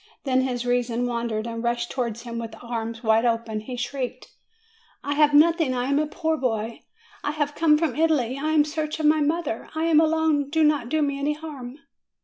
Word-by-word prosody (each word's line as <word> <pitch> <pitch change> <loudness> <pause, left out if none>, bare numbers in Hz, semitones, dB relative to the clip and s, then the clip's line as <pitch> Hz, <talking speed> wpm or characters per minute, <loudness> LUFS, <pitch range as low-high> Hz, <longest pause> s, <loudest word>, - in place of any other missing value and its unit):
Then 260 -2 +2
his 250 -2 -2
reason 245 -1 0
wandered, 235 -2 -2
and 230 0 -5
rushing 235 0 -1
towards 235 -3 -3
him 235 -1 -5
with 230 -1 -6
arms 230 -1 -5
wide 220 0 +3
open, 230 -2 0
he 245 +4 -7
shrieked, 250 +1 -4 0.7
"I 285 - -1
have 295 0 +4
nothing; 320 -3 +4
I 245 0 -1
am 280 +2 +2
a 305 - 0
poor 320 0 -1
boy; 225 -4 -2 0.4
I - - -1
have 295 -1 -1
come 305 -1 +4
from 310 -5 -1
Italy; 295 -6 +1
I 280 +3 -3
am - - +1
in - - +2
search 305 0 -3
of 310 - -1
my 305 0 +4
mother; 300 -5 -1
I 315 - -1
am 325 -2 +5
alone: 315 -3 +2
do 320 +1 +2
not 295 -6 +2
do 310 +1 +1
me 280 -1 -1
any 290 +2 0
harm 290 -5 -8
275 Hz, 210 wpm, -24 LUFS, 235-305 Hz, 0.7 s, am